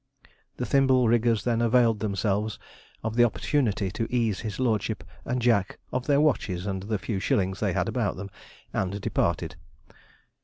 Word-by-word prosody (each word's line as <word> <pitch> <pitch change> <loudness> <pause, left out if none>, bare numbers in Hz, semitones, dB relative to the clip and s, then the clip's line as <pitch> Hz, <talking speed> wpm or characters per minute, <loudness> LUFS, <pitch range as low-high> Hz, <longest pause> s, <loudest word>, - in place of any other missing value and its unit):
The - - -2
thimble 130 -3 +4
riggers 115 -1 +2
then 120 -1 +1
availed 115 -2 +3
themselves 105 0 -1 0.5
of 110 0 -2
the 120 - +6
opportunity 110 -4 +1
to 115 - -3
ease 115 -6 +1
his 110 -1 -5
lordship 115 -6 0 0.2
and 125 +1 -1
Jack 115 -5 +2 0.2
of 125 0 -2
their 145 -1 +4
watches 100 - +1
and 95 -2 -2
the 105 +2 -2
few 100 0 -3
shillings 95 0 0
they - - 0
had - - 0
about - - -1
them, 100 +1 -7 0.4
and 95 +1 -1
departed. - - -1
110 Hz, 160 wpm, -27 LUFS, 100-120 Hz, 0.5 s, the